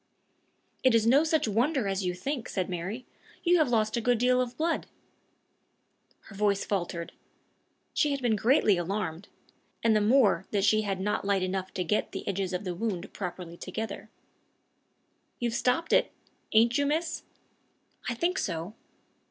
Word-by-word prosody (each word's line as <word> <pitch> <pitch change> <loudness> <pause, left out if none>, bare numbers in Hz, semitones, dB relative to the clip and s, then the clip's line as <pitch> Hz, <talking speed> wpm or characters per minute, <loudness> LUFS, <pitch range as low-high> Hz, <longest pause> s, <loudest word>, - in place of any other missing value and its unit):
"It 255 -3 +5
is 225 -1 +3
no 270 +6 +5
such 315 -5 +1
wonder 240 +3 +1
as 195 0 -1
you 180 -1 -1
think," 255 +6 -4
said 185 -2 -2
Mary; 190 +8 -4 0.4
"you 350 0 +4
have 310 - +3
lost 215 -2 +1
a 235 - 0
good 245 +1 +2
deal 250 +2 +3
of 245 0 -4
blood." 330 +1 0 1.3
Her 205 - -14
voice 200 -1 +1
faltered. 175 -4 -3 0.8
She 300 - +2
had 280 -1 -1
been 240 -4 +1
greatly 220 -3 +3
alarmed 180 -1 -3 0.6
and 225 -1 +4
the 215 - +3
more 210 -5 +3
that 200 -2 0
she 215 +1 +4
had 195 -3 -2
not 210 +2 -1
light 200 -1 +1
enough 190 0 -2
to 185 - 0
get 210 +5 -1
the - - -6
edges 195 -1 -1
of 180 +2 -3
the 180 -2 -3
wound 190 -1 -3
properly 180 -3 -6
together. 220 +4 -5 1.3
"You've 235 -1 -1
stopped 255 +7 +1
it - - +4 0.4
ain't 230 +4 +4
you, 285 - +2
miss?" 320 +2 -1 0.9
"I 240 - -2
think 355 +9 0
so." 170 +1 -3
215 Hz, 165 wpm, -28 LUFS, 190-250 Hz, 1.3 s, It